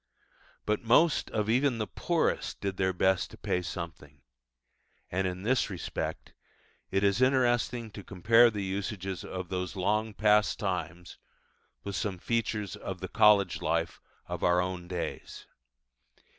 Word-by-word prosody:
But 105 0 0
most 135 +7 +3
of 105 -1 -1
even 125 +2 +2
the 110 - -1
poorest 95 - -1
did 100 -2 -3
their 95 -1 +2
best 95 +1 +1
to - - -13
pay 90 - -1
something; 80 -5 -7 0.9
and 95 +1 0
in 90 +1 -5
this 125 +2 +1
respect 95 -4 -5 0.6
it 95 +1 0
is 100 +3 +2
interesting 120 -3 +2
to 100 - -9
compare 115 +6 +5
the 105 -3 -4
usages 95 -1 -4
of 90 -1 -6
those 90 0 -3
long 105 +3 0
past 105 0 +3
times 90 -3 -4 0.6
with 100 -1 -4
some 95 +1 -2
features 110 -1 -2
of - - -6
the - - -6
college 100 -4 +4
life - - -1 0.2
of - - -5
our 90 0 +3
own 90 -1 -3
days. 90 -1 -5
100 Hz, 145 wpm, -29 LUFS, 90-110 Hz, 0.9 s, compare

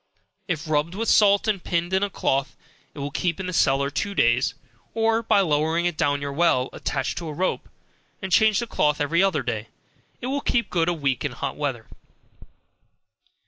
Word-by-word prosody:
If 165 -3 -3
rubbed 155 +3 0
with 225 +2 -1
salt, 205 0 +4
and 200 -4 0
pinned 175 +1 -1
in 190 - +3
a 205 - 0
cloth, 135 -6 -1 0.4
it - - -14
will 140 0 -4
keep 170 +3 -1
in 190 - -4
the 185 - -4
cellar 140 -3 +2
two 200 +7 -3
days, 120 -1 +2 0.4
or 225 0 +2
by 220 -3 +3
lowering 160 0 +1
it 175 -2 0
down 145 -3 0
your 140 0 -4
well, 140 -5 +2
attached 135 -2 -3
to 170 - -6
a 155 - -5
rope, 185 +5 -2 0.5
and 190 -1 -6
changing 220 +3 +4
the - - -15
cloth 150 0 +2
every 155 +4 +2
other 185 -8 +1
day, 115 -3 -3 0.5
it - - -7
will 275 +2 -1
keep 235 -5 0
good 170 -1 +1
a - - +2
week 140 -6 -1
in - - -2
hot - - -4
weather. - - -3
170 Hz, 195 wpm, -24 LUFS, 145-195 Hz, 0.5 s, salt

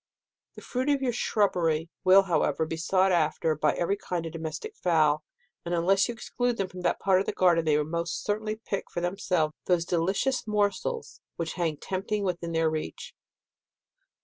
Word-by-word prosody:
The - - -11
fruit 260 +3 -2
of 280 -2 +2
your 245 -2 +1
shrubbery 170 -8 +1
will, 190 +1 +7
however, 170 -3 +1
be 165 - -4
sought 185 +4 +2
after 165 -1 +1
by 150 0 +1
every 195 +4 0
kind 175 -4 -3
of 165 - -5
domestic 165 - -6
fowl, 155 - +2 0.4
and 175 0 -1
unless 190 +3 +3
you 240 - -4
exclude 245 0 -2
them 195 - -1
from 180 0 -9
that - - 0
part 190 -1 +3
of 195 - -2
the - - +1
garden, 170 -3 +3
they 150 -1 +3
will 150 - +1
most 170 +2 -3
certainly 215 +1 -1
pick 215 -3 -5
for - - -4
themselves 175 -3 0
those 175 -2 +2
delicious 195 +10 0
morsels 210 - -1
which 165 -1 -3
hang 165 -4 -1
tempting 200 +4 -3
within 175 -3 -2
their 165 0 +2
reach. 155 -1 -4
180 Hz, 180 wpm, -27 LUFS, 165-205 Hz, 0.4 s, will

